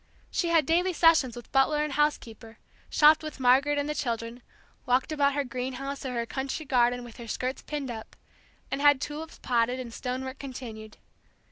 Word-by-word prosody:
She 345 - 0
had 330 -3 +3
daily 355 +4 +2
sessions 320 -7 +4
with 240 -1 -11
butler 295 +3 +3
and 300 -2 -3
house 295 +1 +3
keeper, 225 0 -13 0.3
shopped 305 +1 +6
with 310 -2 -7
Margaret 265 +3 +4
and 285 0 -1
the 300 - -1
children, 235 -3 -3 0.5
walked 255 +5 +2
about 285 -2 +2
her 285 - +1
greenhouse 265 +2 -5
or 260 -2 -4
her 235 0 -1
country 270 +5 -4
garden 245 -2 +2
with 240 -2 -12
her 235 -2 -9
skirts 255 +4 -3
pinned 285 -4 -4
up, 220 -1 -9 0.6
and 275 - -2
had 290 -2 +6
tulips 305 +3 -6
potted 245 +1 0
and 240 -3 -7
stone 255 +2 -4
work 260 +1 -7
continued. 230 -5 -8
265 Hz, 190 wpm, -28 LUFS, 245-295 Hz, 0.6 s, shopped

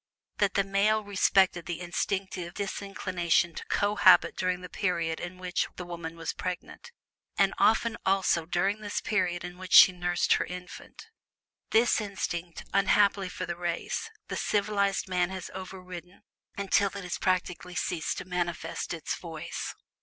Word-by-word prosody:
that 200 -2 +2
the 200 - +4
male 205 +2 +2
respected 190 -3 +2
the 175 -1 -3
instinctive 180 0 -3
disinclination 185 -4 0
to - - -6
cohabit 205 -2 +5
during 185 0 -1
the 180 - -7
period 170 -3 -1
in 175 +1 -6
which 180 0 -1
the 180 - -6
woman 170 -2 -6
was 165 -1 -3
pregnant, 180 - -6 0.5
and - - +3
often 225 +1 +3
also 190 -4 +2
during 195 +4 0
the 205 -1 -2
period 180 -4 0
in 180 0 -8
which 185 -1 -6
she - - +10
nursed 175 -1 +1
her - - +1
infant. 180 - -9 0.6
This 225 0 +4
instinct, 175 -4 -4
unhappily 200 -1 +3
for - - -5
the 175 - -4
race, 175 - -3 0.2
the - - -4
"civilized" 200 -2 +1
man 180 -1 +1
has 190 -2 -6
overridden 185 -1 -9 0.3
until 200 0 +2
it 200 - -5
has 180 -1 -4
practically 180 -1 -1
ceased 175 -2 -1
to 185 - -5
manifest 175 -2 -3
its - - -3
voice. - - -6
185 Hz, 150 wpm, -29 LUFS, 175-200 Hz, 0.6 s, she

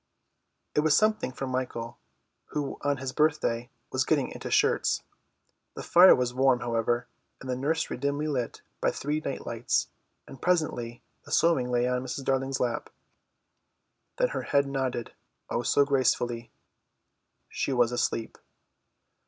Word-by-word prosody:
It - - +2
was 150 0 +4
something 215 -10 +2
for 135 - -5
Michael, 130 -3 -4 0.5
who 145 -2 -4
on 145 -1 +1
his 130 0 -4
birthday 145 -6 +1 0.2
was 130 0 +1
getting 145 -4 +1
into - - -6
shirts. - - +2 0.7
The - - -6
fire 180 +2 +8
was 125 -1 -1
warm, 130 -1 +3
however, 120 0 0 0.3
and 135 - -10
the 130 - -1
nursery 145 +4 -1
dimly 140 +3 -1
lit 130 -6 -3 0.2
by - - +3
three 150 +2 -2
night - - -5
lights, - - 0 0.4
and 135 - -12
presently 125 -9 0 0.2
the - - -12
sewing 160 -7 +3
lay 120 0 +2
on 125 0 0
Mrs. 130 +2 -5
Darling's 135 0 0
lap. 120 -2 -1 1.3
Then - - +2
her - - -3
head 140 0 +2
nodded, 130 -3 -3 0.4
oh, 120 - 0
so 140 +3 +3
gracefully. 120 -4 +1 1.0
She - - -2
was 120 -2 +3
asleep. 115 -2 -2
130 Hz, 145 wpm, -28 LUFS, 120-145 Hz, 1.3 s, fire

